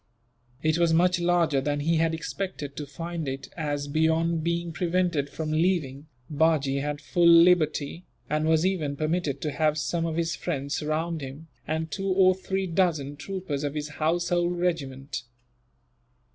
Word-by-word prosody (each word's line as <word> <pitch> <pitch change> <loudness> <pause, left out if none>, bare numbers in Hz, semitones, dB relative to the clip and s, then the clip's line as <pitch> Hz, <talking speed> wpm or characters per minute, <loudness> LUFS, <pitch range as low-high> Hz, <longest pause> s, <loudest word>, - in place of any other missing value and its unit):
It 155 +1 +2
was 170 -1 +3
much 180 +1 +3
larger 170 -5 +2
than 145 +1 -1
he 165 +3 +2
had 160 0 +2
expected 160 -5 -5
to 150 - -5
find 165 +1 -5
it 135 0 -5
as, 145 -3 -2
beyond 160 +2 +1
being 170 0 -1
prevented 175 -4 0
from 155 +1 -4
leaving, 155 -4 0 0.2
Bajee 150 -3 +2
had 145 0 -3
full 170 +3 +2
liberty, 170 -1 +4 0.2
and 155 +2 0
was 160 +1 +3
even 160 -7 0
permitted 155 -2 -1
to 150 - -2
have 155 +1 +1
some 165 +2 -1
of 160 - -3
his 170 0 0
friends 140 -5 -3
round 160 +2 -2
him, 140 +4 -8 0.2
and 160 +1 -2
two 195 0 -3
or 185 -1 +5
three 190 +1 -2
dozen 165 -6 0
troopers 170 -3 -4
of 145 0 -2
his 150 0 -3
household 175 +3 0
regiment. 140 -6 -2
160 Hz, 160 wpm, -26 LUFS, 145-175 Hz, 0.2 s, or